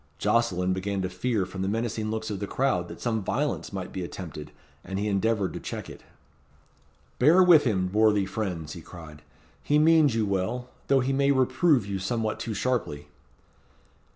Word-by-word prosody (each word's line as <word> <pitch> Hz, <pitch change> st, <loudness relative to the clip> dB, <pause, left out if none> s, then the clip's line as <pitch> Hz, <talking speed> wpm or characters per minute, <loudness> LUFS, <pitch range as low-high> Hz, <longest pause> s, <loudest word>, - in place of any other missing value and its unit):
Jocelyn 95 Hz, -6 st, +1 dB
began 95 Hz, +1 st, -2 dB
to 95 Hz, -, -2 dB
fear 105 Hz, +1 st, -1 dB
from 95 Hz, +1 st, -7 dB
the 95 Hz, -, -1 dB
menacing 110 Hz, 0 st, -2 dB
looks 110 Hz, 0 st, -3 dB
of 100 Hz, -, -4 dB
the 100 Hz, -, -4 dB
crowd 100 Hz, -11 st, 0 dB
that -, -, -10 dB
some 110 Hz, -2 st, -1 dB
violence 145 Hz, +9 st, -2 dB
might 95 Hz, -2 st, -5 dB
be 95 Hz, -, -4 dB
attempted, 80 Hz, -4 st, -8 dB, 0.3 s
and 95 Hz, +1 st, -5 dB
he 105 Hz, +2 st, -1 dB
endeavoured 100 Hz, -1 st, 0 dB
to -, -, -5 dB
check -, -, -6 dB
it. -, -, -12 dB, 1.2 s
"Bear 160 Hz, +8 st, +6 dB
with 165 Hz, -5 st, +6 dB
him, 95 Hz, -6 st, 0 dB
worthy 105 Hz, -2 st, +3 dB
friends," 90 Hz, -8 st, -4 dB
he 85 Hz, -, -9 dB
cried, 80 Hz, -3 st, -12 dB, 0.4 s
"he 145 Hz, -, +2 dB
means 155 Hz, -4 st, +5 dB
you 110 Hz, -2 st, +1 dB
well, 100 Hz, +6 st, -2 dB, 0.2 s
though 135 Hz, -1 st, +4 dB
he 135 Hz, +2 st, 0 dB
may 140 Hz, +1 st, +2 dB
reprove 130 Hz, -, +3 dB
you 100 Hz, -1 st, -3 dB
somewhat 110 Hz, +3 st, -2 dB
too 110 Hz, -2 st, -4 dB
sharply." 95 Hz, -, -2 dB
105 Hz, 180 wpm, -26 LUFS, 95-125 Hz, 1.2 s, Bear